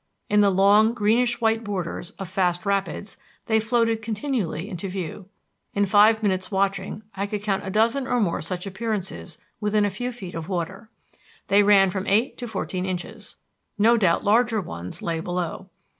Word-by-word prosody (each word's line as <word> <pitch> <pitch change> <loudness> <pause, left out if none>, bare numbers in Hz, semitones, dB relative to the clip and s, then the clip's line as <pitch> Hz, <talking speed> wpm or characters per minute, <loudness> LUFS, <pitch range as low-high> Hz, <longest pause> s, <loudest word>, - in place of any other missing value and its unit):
In 210 0 +5
the 200 - +5
long, 205 +4 +4
greenish 235 +2 +2
white 225 0 +2
borders 190 -4 -4
of 195 - -6
fast 180 0 0
rapids 200 0 -2 0.3
they 220 -1 +2
floated 230 0 +1
continually 215 - -2
into 195 -2 -5
view. 185 +1 -6 0.5
In 205 0 +3
five 215 +3 +5
minutes' 185 -2 0
watching 195 +2 -1
I 200 +1 -3
could 205 0 -4
count 195 -2 -1
a - - -2
dozen 230 +6 +1
or 245 - +1
more 195 -7 0
such 180 +3 -4
appearances 195 -4 -4 0.2
within 210 0 +2
a 205 - 0
few 245 +6 -4
feet 195 -7 -9
of 165 +1 -6
water. 180 +4 -4 0.6
They 200 +1 +6
ran 200 -2 +5
from 190 +1 -4
eight 220 +7 +2
to 245 - -4
fourteen 190 -3 -3
inches. 180 -2 -6 0.4
No 225 +3 +5
doubt 190 -7 +2
larger 225 +2 +3
ones 90 - -7
lay 165 -1 -1
below. 180 +2 -4
200 Hz, 175 wpm, -24 LUFS, 185-220 Hz, 0.6 s, They